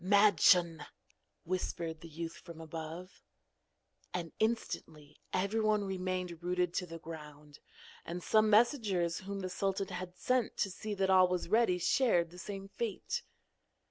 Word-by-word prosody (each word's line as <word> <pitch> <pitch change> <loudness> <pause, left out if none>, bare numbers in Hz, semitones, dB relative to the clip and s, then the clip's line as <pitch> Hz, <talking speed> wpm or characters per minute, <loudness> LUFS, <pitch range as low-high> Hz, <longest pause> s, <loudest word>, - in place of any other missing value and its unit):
'Madschun!' 185 -5 +5 0.6
whispered 165 -2 -3
the 165 - -9
youth 165 +1 -5
from 170 -2 -11
above. 165 +3 -7 0.9
And 170 -2 -3
instantly 155 -9 -2
everyone 210 +2 +1
remained 185 -3 -3
rooted 180 0 0
to 180 - -2
the 165 0 -7
ground; 150 -2 -10 0.4
and 175 +1 -5
some 215 0 +4
messengers 210 - +3
whom 195 +1 -5
the 185 - -2
sultan 195 +1 -1
had 180 -1 -6
sent 250 -3 0
to 195 - 0
see 210 +2 -5
that 190 -1 +2
all 185 -1 +7
was 180 -1 -2
ready 215 -4 +4
shared 175 -2 +2
the 180 - -11
same 195 0 -6
fate. 235 - -3
185 Hz, 140 wpm, -33 LUFS, 170-200 Hz, 0.9 s, all